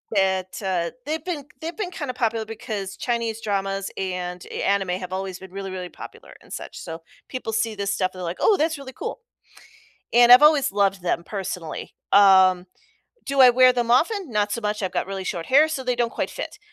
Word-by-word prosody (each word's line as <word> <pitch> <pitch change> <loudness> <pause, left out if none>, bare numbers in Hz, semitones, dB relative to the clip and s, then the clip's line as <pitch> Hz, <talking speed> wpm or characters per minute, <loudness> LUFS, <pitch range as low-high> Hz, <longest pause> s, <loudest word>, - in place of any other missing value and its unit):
that, 190 -1 0
uh, 180 -4 -1 0.2
they've 310 0 -3
been 340 -6 -3 0.2
they've 330 +2 -5
been 410 -4 -3
kinda 290 -7 -5
popular 225 -2 -1
because 210 -3 -6
Chinese 230 -2 -2
dramas 195 -1 -2
and 180 -1 -4
a - - -4
anime 195 -2 +1
have 185 0 -3
always 190 0 -4
been 190 -1 -12
really, 195 0 -6
really 180 -1 -5
popular - - -12
and - - -12
such. - - -7
So, 165 0 -7 0.3
people 255 -4 -4
see 225 0 0
this 200 -1 -2
stuff, 185 -1 0
they're 185 - -9
like, 175 0 -4
"Oh, 430 - +4
that's 320 -2 0
really 270 -2 -9
cool." 470 - -6 0.9
And 240 0 +6
I've 250 +4 +10
always 300 -2 +5
loved 195 -1 +1
them, 170 -1 -1
personally. 185 -5 -5 0.2
Um, 190 -2 +6 0.6
do 275 -1 +2
I 255 - +9
wear 255 +1 +6
them 240 -1 -1
often? 350 - +2
Not 210 -2 0
so 235 - -2
much, 210 -1 -2
I've 185 - -1
got - - -2
really 195 -1 -4
short 170 -3 -4
hair, 295 +4 +6
so 295 -4 -4
they 250 -1 0
don't 240 -1 0
quite - - -2
fit. - - -7
205 Hz, 210 wpm, -23 LUFS, 190-255 Hz, 0.9 s, I've